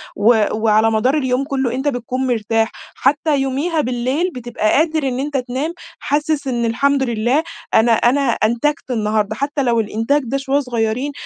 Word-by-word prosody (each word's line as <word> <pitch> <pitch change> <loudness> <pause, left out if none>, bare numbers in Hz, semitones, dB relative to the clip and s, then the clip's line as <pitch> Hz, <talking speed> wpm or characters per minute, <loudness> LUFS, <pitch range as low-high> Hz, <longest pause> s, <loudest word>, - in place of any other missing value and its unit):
و 220 +1 +4
وعلى 220 0 +2
مدار 250 +7 +2
اليوم 260 -1 0
كُلّه 265 -4 -1
أنت 265 +3 -2
بتكون 255 0 -2
مرتاح، 225 -1 0 0.2
حتى 290 +2 +1
يوميها 295 +5 0
بالليل 255 +7 -1
بتبقى 240 -3 -2
قادر 315 -2 +2
إن 255 -1 -2
أنت 285 0 -2
تنام، 260 +6 -3 0.3
حاسس 295 0 -1
إن 240 -2 -1
الحمد 275 +4 +1
لله 240 +5 +1 0.3
أنا 225 +2 +4
أنا 240 +5 +3
أنتجت 235 +6 -1
النهارده، 215 -2 0
حتى 280 +3 -2
لو 235 -2 +2
الإنتاج 225 +7 0
ده 270 +4 -1
شوّية 275 +1 0
صغيرين 245 +1 -1
255 Hz, 160 wpm, -18 LUFS, 230-280 Hz, 0.3 s, و